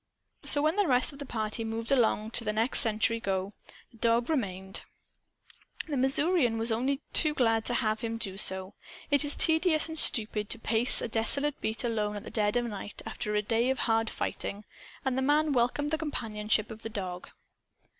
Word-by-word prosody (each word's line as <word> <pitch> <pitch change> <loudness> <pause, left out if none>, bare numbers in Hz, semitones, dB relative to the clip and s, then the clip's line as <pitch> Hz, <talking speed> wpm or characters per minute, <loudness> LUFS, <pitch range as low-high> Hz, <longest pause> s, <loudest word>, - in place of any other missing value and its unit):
So, 290 - +4
when 310 +5 +1
the 410 -3 +2
rest 255 +2 +2
of 280 - -14
the 285 - -8
party 220 -1 -4
moved 225 +2 -4
along 225 -4 +1
to 235 - 0
the 215 - -1
next 225 +4 +4
sentry 225 0 +3
go, 195 -2 -3 0.4
the 230 - -19
dog 235 +4 +1
remained. 190 -8 -3 1.1
The 300 - -3
Missourian 270 -1 +3
was 225 +1 +4
only 265 +5 -1
too 305 -2 +6
glad 225 -4 +1
to 245 - -1
have 215 -3 0
him 230 -1 -4
do 195 -4 -5
so. 190 0 -3 0.4
It 285 +1 +4
is 290 0 0
tedious 320 -1 +3
and 320 -1 -3
stupid 215 -5 +1
to - - 0
pace 230 +2 +5
a - - -2
desolate 270 +6 -2
beat, 220 +2 -3
alone, 215 -3 -2
at 205 - -8
dead 210 -1 +1
of 240 - -1
night, 205 -2 -8
after 210 0 -4
a 210 - 0
day 230 +3 0
of 265 - -1
hard 225 -1 +1
fighting. 205 +1 -5 0.4
And 265 -1 0
the 265 - -1
man 295 +2 +1
welcomed 260 +4 0
the 315 - -1
companionship 220 -7 -1
of 220 0 -10
the 225 - -6
dog. 185 -4 -6
230 Hz, 195 wpm, -28 LUFS, 215-275 Hz, 1.1 s, too